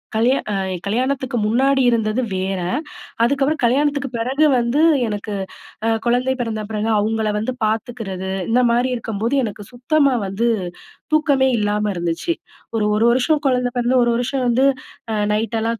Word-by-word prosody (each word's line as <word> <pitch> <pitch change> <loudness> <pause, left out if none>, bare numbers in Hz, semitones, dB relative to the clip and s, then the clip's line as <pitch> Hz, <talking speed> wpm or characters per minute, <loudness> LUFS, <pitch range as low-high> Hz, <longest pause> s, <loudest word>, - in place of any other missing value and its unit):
கல்யா 245 +5 +3
அ - - -1 0.3
கல்யாணத்துக்கு 255 +4 -1
முன்னாடி 265 +5 +2
இருந்தது 225 +1 +1
வேற, 190 0 -2 0.6
அதுக்கப்புறம் 280 +5 +1
கல்யாணத்துக்கு 280 +2 +1
பெறகு 260 +7 +1
வந்து 235 +4 0 0.3
எனக்கு, 210 0 -4 0.5
அ - - +2 0.2
குழந்தை 250 +2 +2
பிறந்த 220 -2 -3
பிறகு, 215 0 -2
அவுங்கள 220 0 0
வந்து 220 +4 -2
பாத்துக்கிறது 215 -4 -3 0.2
இந்த 245 +2 +3
மாரி 245 +2 +2
இருக்கும்போது 225 +2 -2
எனக்கு 210 -1 -5
சுத்தமா 275 +3 +2
வந்து 205 +5 -1 0.7
தூக்கமே 285 -4 +3
இல்லாம 210 0 0
இருந்துச்சு. 175 - -1 0.4
ஒரு 215 -2 +1
1 225 +2 +2
வருஷம், 275 +5 +2
குழந்தை 250 -2 +2
பிறந்து 245 +2 +1
1 240 - +2
வருஷம் 255 +2 -1
வந்து, 250 +3 +3 0.5
அ - - 0 0.2
நைட் 225 +2 -1
எல்லாம் 230 0 -1
235 Hz, 145 wpm, -20 LUFS, 215-260 Hz, 0.7 s, கல்யா